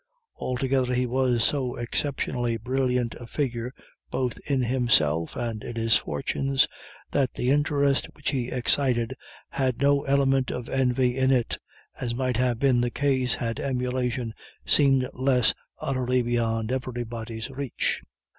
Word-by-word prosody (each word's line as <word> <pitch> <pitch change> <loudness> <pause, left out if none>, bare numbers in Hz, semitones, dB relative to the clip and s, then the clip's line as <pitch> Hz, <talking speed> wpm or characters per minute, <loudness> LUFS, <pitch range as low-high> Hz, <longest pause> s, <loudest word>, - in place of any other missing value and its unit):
Altogether 130 0 0
he 125 +1 +2
was 125 -1 +2
so 130 -2 0
exceptionally 120 -1 -1
brilliant 125 0 0
a 120 - -9
figure 125 -4 -2 0.4
both 125 -2 -2
in 135 -3 +2
himself 110 - +2
and 115 -3 -3
in 120 - -6
his 115 -1 +3
fortunes, 135 0 +1 0.4
that 135 -3 +1
the 125 - +1
interest 145 -1 +2
which 145 - -2
he 125 -4 -1
excited 125 -1 +1 0.3
had 130 -3 0
no 140 0 +4
element 135 -1 +3
of 125 -1 -4
envy 125 -1 +2
in 130 0 +2
it, 125 -3 +1 0.4
as 120 -2 -2
might 130 -2 0
have 125 -2 +1
been 130 -1 +3
the 120 - +1
case 130 -2 +1
had 115 -2 -3
emulation 125 -2 -1 0.3
seemed 135 -3 +4
less 125 -4 +3 0.2
utterly 125 -2 0
beyond 115 -1 0
everybody's 120 -2 -4
reach. 135 -2 -2
125 Hz, 135 wpm, -26 LUFS, 120-135 Hz, 0.4 s, no